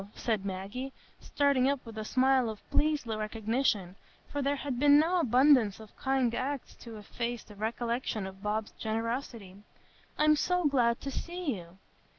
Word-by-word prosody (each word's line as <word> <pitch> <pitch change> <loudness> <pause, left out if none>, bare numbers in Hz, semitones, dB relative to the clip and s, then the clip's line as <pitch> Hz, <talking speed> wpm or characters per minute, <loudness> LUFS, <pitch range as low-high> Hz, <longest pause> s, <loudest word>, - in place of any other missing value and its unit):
said 220 -5 -1
Maggie, 200 +8 -5 0.3
starting 280 -2 +2
up 280 -3 -2
with 225 -1 -9
a 215 - -4
smile 260 +1 +3
of 215 -1 -9
pleased 300 -2 +2
recognition, 215 -3 -1 0.4
for 290 - -2
there 280 +1 +1
had 275 -3 -4
been 290 +1 +7
no 335 +4 +3
abundance 255 - +4
of 220 -1 -13
kind 265 -3 +1
acts 275 +2 -3
to 230 -2 -10
efface 235 +3 -4
the 210 - -14
recollection 230 0 -2
of 190 0 -9
Bob's 210 +1 -2
generosity; 225 -3 -3 0.6
"I'm 305 0 +5
so 360 +3 +1
glad 240 -5 +2
to 275 - -4
see 345 -4 -3
you." 175 -1 -11
240 Hz, 160 wpm, -30 LUFS, 215-275 Hz, 0.6 s, been